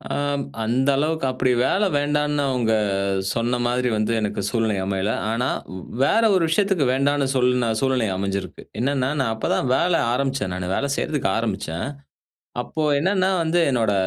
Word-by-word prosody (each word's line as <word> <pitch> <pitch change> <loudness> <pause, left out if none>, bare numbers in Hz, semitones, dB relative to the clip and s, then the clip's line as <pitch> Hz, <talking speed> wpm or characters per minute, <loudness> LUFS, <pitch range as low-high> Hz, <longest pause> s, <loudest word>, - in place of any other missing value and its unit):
ஆம். 145 0 -1 0.2
அந்த 125 +5 +1
அளவுக்கு 155 +1 0
அப்படி 130 0 0
வேலை 205 +1 +2
வேண்டாம்னு 145 0 +1
அவங்க 120 -4 +1 0.6
சொன்ன 120 +2 0
மாதிரி 125 +1 0
வந்து, 110 +1 0
எனக்கு 105 -2 -2
சூழ்நிலை 110 -4 0
அமையல. 95 +2 -1 0.2
ஆனா, 120 +3 0 0.5
வேற 220 +11 +3
ஒரு 185 - +2
விஷயத்துக்கு 190 -3 +2
வேண்டாம்னு 140 +1 +1
சொல்லுன 125 -2 +2
சூழ்நிலை 130 -4 +1
அமைஞ்சிருக்கு. 100 0 -4 0.2
என்னான்னா, 130 +1 0
நான் 115 -4 0
அப்பதான் 110 +3 -1
வேலை 170 +2 +2
ஆரம்பிச்சேன், 130 -7 -1
நானு. 90 0 -3
வேலை 140 - -1
செய்யறதுக்கு 145 -10 -1
ஆரம்பிச்சேன். 95 -7 -3 0.8
அப்போ, 155 - -4 0.2
என்னோட 170 - +1
130 Hz, 135 wpm, -22 LUFS, 115-145 Hz, 0.8 s, வேற